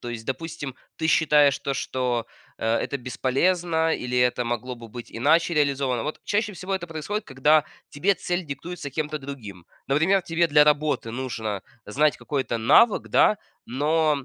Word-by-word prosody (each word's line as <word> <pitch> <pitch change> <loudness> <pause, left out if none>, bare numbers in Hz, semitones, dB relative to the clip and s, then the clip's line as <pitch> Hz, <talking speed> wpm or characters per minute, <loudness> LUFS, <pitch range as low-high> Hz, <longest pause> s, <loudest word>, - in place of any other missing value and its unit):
То 120 - -7
есть, 115 -2 -6
допустим, 145 -1 -5 0.2
ты 160 - -1
считаешь 150 -4 +4
то, 140 - -3
что, 125 -4 -1 0.3
э, - - -6
это 140 - -2
бесполезно, 160 +6 0
или 125 0 -3
это 125 0 +2
могло 120 +2 -3
бы 115 -1 -12
быть 120 +2 -10
иначе 160 +8 +2
реализовано. 140 -5 +1
Вот 150 - -4
чаще 205 0 -1
всего 185 +2 -4
это 175 -2 -3
происходит, 165 +6 -4
когда 150 +3 +3 0.3
тебе 190 +8 +1
цель 175 -2 -3
диктуется 160 +3 -6
кем-то 150 +2 -3
другим. 110 - -9 0.2
Например, 160 +8 +3
тебе 170 0 +1
для 150 -1 +5
работы 150 -5 +1
нужно 115 -5 -4 0.2
знать 145 +4 +1
какой-то 130 -4 -2
навык, 200 - +4
да, 215 - +4 0.3
но 150 +2 +1
145 Hz, 160 wpm, -24 LUFS, 125-165 Hz, 0.3 s, для